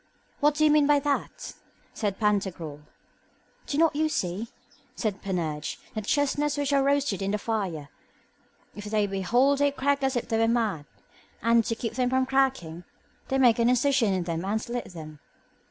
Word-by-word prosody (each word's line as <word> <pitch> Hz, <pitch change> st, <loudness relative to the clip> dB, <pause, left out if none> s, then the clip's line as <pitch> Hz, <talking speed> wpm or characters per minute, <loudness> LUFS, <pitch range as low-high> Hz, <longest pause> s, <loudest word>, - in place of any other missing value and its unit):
What 295 Hz, 0 st, +3 dB
do 310 Hz, +1 st, +3 dB
you 305 Hz, -, +5 dB
mean 300 Hz, -1 st, +4 dB
by 295 Hz, -1 st, +5 dB
that? 285 Hz, -1 st, -3 dB, 0.4 s
said 205 Hz, -4 st, -2 dB
Pantagruel. 190 Hz, -8 st, -1 dB, 0.9 s
Do 285 Hz, -, -2 dB
not 325 Hz, -1 st, +3 dB
you 310 Hz, +1 st, +1 dB
see, 210 Hz, -, -2 dB, 0.5 s
said 210 Hz, -4 st, -3 dB
Panurge, 160 Hz, -6 st, -3 dB, 0.2 s
that 215 Hz, -2 st, -4 dB
the -, -, -14 dB
chestnuts 290 Hz, 0 st, +1 dB
which 285 Hz, -1 st, 0 dB
are 275 Hz, -, +4 dB
roasted 275 Hz, -7 st, +1 dB
in 195 Hz, -, -1 dB
the 210 Hz, -, 0 dB
fire, 195 Hz, -10 st, -3 dB, 0.9 s
if 205 Hz, +1 st, -8 dB
they 210 Hz, 0 st, +1 dB
be 195 Hz, -1 st, -3 dB
whole 250 Hz, +8 st, +3 dB
they 285 Hz, +1 st, +2 dB
crack 280 Hz, 0 st, 0 dB
as 265 Hz, -1 st, 0 dB
if 240 Hz, -, -2 dB
they 225 Hz, -, 0 dB
were 225 Hz, -, +3 dB
mad, 220 Hz, -11 st, 0 dB, 0.6 s
and, 230 Hz, 0 st, +4 dB
to 230 Hz, -, -1 dB
keep 230 Hz, -1 st, -4 dB
them 250 Hz, +1 st, 0 dB
from 260 Hz, 0 st, +2 dB
cracking, 260 Hz, -12 st, 0 dB, 0.4 s
they 270 Hz, -, 0 dB
make 245 Hz, -3 st, +4 dB
an 235 Hz, +1 st, +4 dB
incision 250 Hz, -3 st, +2 dB
in 185 Hz, -2 st, 0 dB
them 170 Hz, 0 st, -3 dB
and 205 Hz, +3 st, -1 dB
slit 240 Hz, +2 st, -4 dB
them? 155 Hz, -4 st, -10 dB
230 Hz, 185 wpm, -26 LUFS, 195-275 Hz, 0.9 s, you